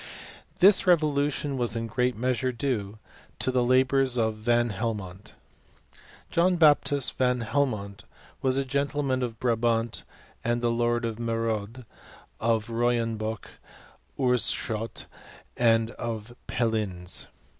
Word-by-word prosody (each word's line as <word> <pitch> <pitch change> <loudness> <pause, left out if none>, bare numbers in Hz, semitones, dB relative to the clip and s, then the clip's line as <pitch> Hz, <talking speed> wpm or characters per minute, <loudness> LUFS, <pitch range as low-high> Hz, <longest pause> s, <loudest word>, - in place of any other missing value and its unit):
Thii 195 +1 +6
revolution 145 -4 +2
was 120 -2 0
in 115 - -2
a - - -4
great 125 +1 0
measure 125 +1 0
due 115 -5 -3 0.4
to 130 - 0
the 125 -1 +2
labours 130 +1 +2
of 110 -1 +1
Van 120 +2 +1
Helmont, 100 -3 -5 1.0
John 180 +2 +3
Baptist 145 -4 +3
Van 125 -1 +2
Helmont 110 -5 -2 0.4
was 130 0 +1
a 135 - 0
gentleman 140 -1 -1
of 115 -3 -4
Brabant, 115 -1 0 0.4
and 120 +1 -1
Lord 120 0 +1
of 115 -2 -3
Metode, 115 0 -3 0.5
of 110 -1 +1
Royenboch, 115 -2 -1
of - - -22
Oorschot, 115 -3 0 0.5
and 115 -1 +3
of 115 -1 -6
Pellines. 105 -7 0
120 Hz, 115 wpm, -27 LUFS, 110-130 Hz, 1.0 s, Thii